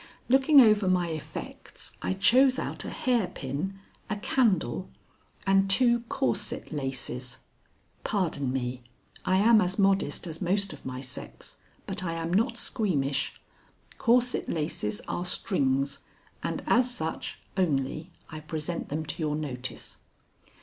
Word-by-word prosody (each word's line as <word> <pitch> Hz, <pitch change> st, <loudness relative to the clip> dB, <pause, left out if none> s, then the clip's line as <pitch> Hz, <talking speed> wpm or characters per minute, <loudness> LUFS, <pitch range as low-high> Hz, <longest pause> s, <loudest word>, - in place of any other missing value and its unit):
Looking 270 Hz, +3 st, +7 dB
over 215 Hz, -5 st, +6 dB
my 180 Hz, -2 st, +2 dB
effects, 155 Hz, -2 st, -6 dB
I -, -, 0 dB
chose 255 Hz, +7 st, +5 dB
out -, -, -3 dB
a -, -, -4 dB
hairpin, 190 Hz, -, -1 dB, 0.3 s
a 210 Hz, -, 0 dB
candle, 195 Hz, -, +1 dB, 0.6 s
and 195 Hz, 0 st, +4 dB
two 240 Hz, +3 st, +4 dB
corset 120 Hz, -3 st, -1 dB
laces, 130 Hz, -4 st, -3 dB, 0.7 s
(Pardon 160 Hz, -9 st, 0 dB
me. 125 Hz, -1 st, -2 dB, 0.4 s
I 185 Hz, -, +3 dB
am 220 Hz, +2 st, +6 dB
as 185 Hz, 0 st, 0 dB
modest 195 Hz, -6 st, +2 dB
as 165 Hz, 0 st, -6 dB
most 195 Hz, 0 st, +1 dB
of 150 Hz, -, -10 dB
my 130 Hz, 0 st, -5 dB
sex, 130 Hz, -2 st, -7 dB, 0.3 s
but 190 Hz, 0 st, -2 dB
I 165 Hz, -2 st, -2 dB
am 165 Hz, +1 st, -3 dB
not 230 Hz, +4 st, +2 dB
squeamish. 150 Hz, -, 0 dB, 0.6 s
Corset 245 Hz, 0 st, +2 dB
laces 150 Hz, -10 st, -2 dB
are 175 Hz, -, -3 dB
strings, 140 Hz, -7 st, +1 dB, 0.4 s
and -, -, -3 dB
as 250 Hz, +1 st, +3 dB
such 160 Hz, -9 st, -3 dB, 0.2 s
only 155 Hz, -2 st, 0 dB, 0.2 s
I 155 Hz, -, -7 dB
present 155 Hz, +2 st, -4 dB
them 155 Hz, +2 st, -2 dB
to -, -, -5 dB
your 150 Hz, -1 st, 0 dB
notice.) 130 Hz, -4 st, -5 dB
175 Hz, 130 wpm, -28 LUFS, 140-205 Hz, 0.7 s, Looking